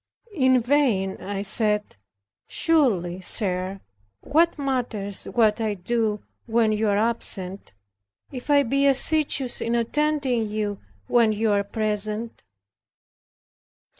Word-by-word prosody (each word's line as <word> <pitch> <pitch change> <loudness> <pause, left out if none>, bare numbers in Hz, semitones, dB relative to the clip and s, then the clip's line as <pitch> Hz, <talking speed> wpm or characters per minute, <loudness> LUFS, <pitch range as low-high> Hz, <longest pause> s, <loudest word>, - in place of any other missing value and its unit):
In 260 -6 +3
vain 235 -7 +1
I 200 0 -4
said, 210 0 +2 0.5
"Surely, 200 - +1
sir, 185 -1 -1 0.4
what 330 +4 +1
matters 245 -8 -2
it - - -10
what 220 -2 +3
I 215 -2 -1
do 215 +2 -2 0.2
when 225 -1 +2
you 215 +1 0
are 200 -1 +1
absent, 200 - -2 0.6
if 255 +1 -9
I 285 -1 +5
be 275 +3 +1
assiduous 275 -2 +3
in 230 +1 -1
attending 255 -2 0
you 210 -1 -3 0.3
when 230 -3 +3
you 215 +1 0
are 200 0 +1
present?" 215 +2 -3
225 Hz, 115 wpm, -23 LUFS, 205-260 Hz, 0.6 s, I